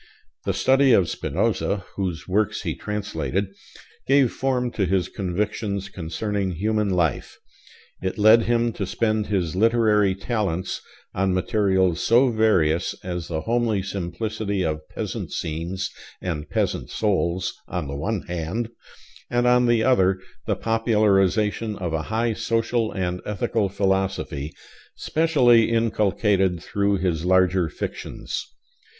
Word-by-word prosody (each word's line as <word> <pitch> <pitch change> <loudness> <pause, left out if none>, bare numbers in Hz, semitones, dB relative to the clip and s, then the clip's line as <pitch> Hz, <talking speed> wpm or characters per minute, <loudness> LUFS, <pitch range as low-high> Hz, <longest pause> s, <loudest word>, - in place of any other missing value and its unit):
The - - 0
study 135 -1 +4
of 95 -6 +4
Spinoza 100 -2 -1
(whose 90 -5 -3
works 100 +3 0
he - - -1
translated) 100 -2 -3 0.5
gave 135 -3 +4
form 125 -2 -1
to 100 -5 0
his 95 -1 +1
convictions 100 +1 -3
concerning 95 +2 -3
human 105 +4 0
life. 85 -4 0 0.6
It 95 +4 -3
led 110 +2 +7
him 120 -1 +1
to 100 - -4
spend 110 +1 0
his 90 -5 -1
literary 105 -2 +3
talents 95 -4 -2 0.3
on 95 -1 +1
materials 95 -4 +1
so 120 +2 +4
various 95 -8 +2
as 90 -2 -4
the 80 -2 -3
homely 115 -3 0
simplicity 100 +2 -3
of 75 -1 -3
peasant - - -5
scenes 85 +4 -3 0.3
and 80 -5 -4
peasant - - -1
souls, 95 -4 0
on 85 -5 -3
the 70 - -5
one 100 +7 -2
hand, 90 +7 -3 0.6
and 120 0 +1
on 125 0 +4
the 120 -2 +3
other 95 -7 +3 0.3
the - - +1
popularization 110 -1 +1
of 90 -4 -4
a 80 - 0
high 115 +1 +1
social 115 +1 0
and 90 -1 -2
ethical 105 0 -1
philosophy, 95 -6 -1 0.4
specially 130 -9 +3
inculcated 105 -5 +1
through 100 +3 0
his 90 -4 -1
larger 95 -1 +3
fictions. - - -5
100 Hz, 125 wpm, -23 LUFS, 90-110 Hz, 0.6 s, led